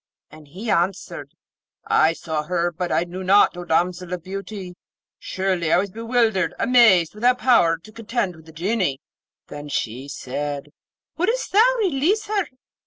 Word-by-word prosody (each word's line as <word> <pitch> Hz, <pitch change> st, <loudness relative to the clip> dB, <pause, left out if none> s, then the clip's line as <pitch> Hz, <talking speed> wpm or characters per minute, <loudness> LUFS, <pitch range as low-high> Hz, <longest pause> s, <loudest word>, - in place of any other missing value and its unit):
And 155 Hz, -1 st, -14 dB
he 200 Hz, +9 st, -5 dB
answered, 175 Hz, -5 st, -2 dB, 0.5 s
'I 160 Hz, -, +3 dB
saw 160 Hz, -2 st, -3 dB
her; 175 Hz, +1 st, 0 dB
but 175 Hz, +1 st, -4 dB
I -, -, +2 dB
knew 180 Hz, +2 st, -7 dB
not, 195 Hz, 0 st, +4 dB
O 175 Hz, -, -6 dB
damsel 175 Hz, +2 st, 0 dB
of 180 Hz, -2 st, -5 dB
beauty; 195 Hz, 0 st, -7 dB, 0.5 s
surely 185 Hz, -4 st, -1 dB
I -, -, +5 dB
was 195 Hz, +1 st, -1 dB
bewildered, 225 Hz, -4 st, 0 dB
amazed, 220 Hz, -9 st, +5 dB
without 245 Hz, +4 st, +2 dB
power 200 Hz, -11 st, +4 dB
to 190 Hz, +7 st, -16 dB
contend 230 Hz, -4 st, -3 dB
with 160 Hz, 0 st, -17 dB
the -, -, -12 dB
Genie.' 175 Hz, -4 st, -1 dB, 0.5 s
Then 145 Hz, 0 st, -9 dB
she 130 Hz, 0 st, -3 dB
said, 145 Hz, +1 st, -5 dB, 0.5 s
'Wouldst 450 Hz, +9 st, -1 dB
thou 470 Hz, +5 st, +5 dB
release 380 Hz, -, +1 dB
her? 410 Hz, -3 st, -1 dB
185 Hz, 155 wpm, -22 LUFS, 165-230 Hz, 0.5 s, I